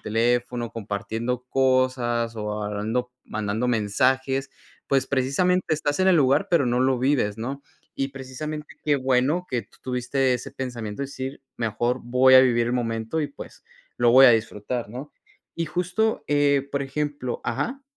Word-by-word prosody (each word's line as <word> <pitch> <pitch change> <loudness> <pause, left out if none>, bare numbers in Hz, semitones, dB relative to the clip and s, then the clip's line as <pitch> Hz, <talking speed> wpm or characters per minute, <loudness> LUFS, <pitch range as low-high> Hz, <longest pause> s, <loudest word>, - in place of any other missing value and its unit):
teléfono 120 +1 0
compartiendo 115 +3 -4
cosas, 130 -3 +1
o 105 0 -3
hablando 110 +5 -2
mandando 110 +3 -2
mensajes, 130 +5 +1 0.4
pues, 135 -1 +1
precisamente 155 +6 +1
estás 145 +1 -1
en 190 - +4
el 180 - +5
lugar, 140 +7 +3
pero 170 -5 +4
no 120 +1 +1
lo 130 -1 +2
vives, 125 -6 +1
¿no? 135 +5 -5 0.3
Y 135 0 -1
precisamente 140 +3 -7
qué 145 -2 +2
bueno 135 +7 +1
que 120 -3 -1
tú 100 - -24
tuviste 130 +1 0
ese 125 - -3
pensamiento 120 -3 -5
de 140 - -2
decir: 135 0 -7 0.2
"Mejor 120 +2 -1
voy 125 +2 +4
a 130 - +10
vivir 120 -2 +3
el - - -1
momento 115 +4 -2
y, 150 - 0
pues, 145 - -12 0.4
lo 120 -1 +4
voy 135 +1 +9
a 125 - +9
disfrutar", 115 +1 -1
¿no? 130 +7 -8 0.4
Y 165 -1 -2
justo, 180 +7 -1
eh, 145 -1 +2
por 140 - -1
ejemplo 140 -2 -3
Ajá 240 - -2
130 Hz, 160 wpm, -24 LUFS, 120-140 Hz, 0.4 s, a